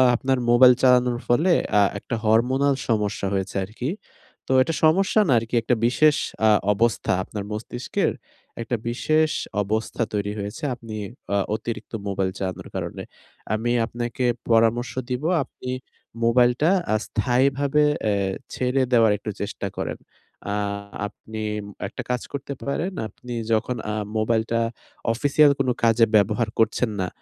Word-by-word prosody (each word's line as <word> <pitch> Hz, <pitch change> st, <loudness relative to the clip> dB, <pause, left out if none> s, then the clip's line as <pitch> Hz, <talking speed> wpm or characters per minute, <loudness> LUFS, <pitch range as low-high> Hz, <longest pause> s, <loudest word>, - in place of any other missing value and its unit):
আপনার 130 Hz, +2 st, 0 dB
মোবাইল 125 Hz, +1 st, +8 dB
চালানোর 125 Hz, -2 st, +4 dB
ফলে 160 Hz, +9 st, +3 dB, 0.3 s
আ -, -, +6 dB, 0.2 s
একটা 115 Hz, -, -4 dB
hormonal 130 Hz, +6 st, +3 dB
সমস্যা 105 Hz, -3 st, 0 dB
হয়েছে 95 Hz, 0 st, -2 dB
আরকি। 115 Hz, +6 st, -5 dB, 0.6 s
তো -, -, -3 dB
এটা 165 Hz, +5 st, 0 dB
সমস্যা 190 Hz, +6 st, +3 dB
না 135 Hz, -, +2 dB
আরকি 115 Hz, +2 st, -5 dB
একটা 120 Hz, +2 st, +1 dB
বিশেষ 150 Hz, +5 st, +4 dB, 0.3 s
আ -, -, +6 dB, 0.2 s
অবস্থা 115 Hz, 0 st, +1 dB
আপনার 105 Hz, 0 st, -6 dB
মস্তিষ্কের 115 Hz, +3 st, -2 dB, 0.5 s
একটা 120 Hz, +1 st, -2 dB
বিশেষ 155 Hz, +6 st, +1 dB, 0.3 s
অবস্থা 110 Hz, +4 st, -2 dB
তৈরি 105 Hz, 0 st, -1 dB
হয়েছে। 105 Hz, +10 st, -6 dB
আপনি 115 Hz, -3 st, -9 dB, 0.4 s
আ -, -, +3 dB, 0.2 s
অতিরিক্ত 115 Hz, +1 st, -6 dB
মোবাইল 95 Hz, -1 st, 0 dB
চালানোর 95 Hz, -2 st, -4 dB
কারণে। -, -, -4 dB, 0.5 s
আমি 115 Hz, +3 st, 0 dB
আপনাকে 120 Hz, +1 st, -3 dB, 0.2 s
পরামর্শ 115 Hz, +2 st, +3 dB, 0.2 s
দিবো 130 Hz, +7 st, -1 dB
আপনি 125 Hz, -, -10 dB, 0.5 s
মোবাইলটা 125 Hz, +5 st, +4 dB, 0.2 s
আ -, -, +4 dB
স্থায়ীভাবে 135 Hz, +5 st, +2 dB, 0.3 s
এ -, -, +2 dB, 0.4 s
ছেড়ে 130 Hz, +1 st, 0 dB
দেওয়ার 115 Hz, -3 st, +5 dB
একটু 105 Hz, +1 st, -5 dB
চেষ্টা 100 Hz, -1 st, -4 dB
করেন। -, -, -3 dB, 0.6 s
আ -, -, 0 dB, 0.5 s
আপনি 110 Hz, +1 st, -9 dB, 0.5 s
একটা 105 Hz, -, -7 dB
কাজ 125 Hz, 0 st, 0 dB
করতে 140 Hz, 0 st, -4 dB
পারেন। 165 Hz, +7 st, -1 dB, 0.2 s
আপনি 125 Hz, +2 st, -10 dB, 0.2 s
যখন 110 Hz, +3 st, 0 dB, 0.2 s
আ -, -, -2 dB, 0.2 s
মোবাইলটা 115 Hz, +1 st, +1 dB, 0.5 s
official 145 Hz, +4 st, +4 dB
কোনো 130 Hz, -2 st, +2 dB
কাজে 115 Hz, 0 st, +5 dB
ব্যবহার 105 Hz, +3 st, +3 dB
করছেন 115 Hz, +1 st, +2 dB
না 90 Hz, -, -1 dB
120 Hz, 135 wpm, -23 LUFS, 110-130 Hz, 0.6 s, মোবাইল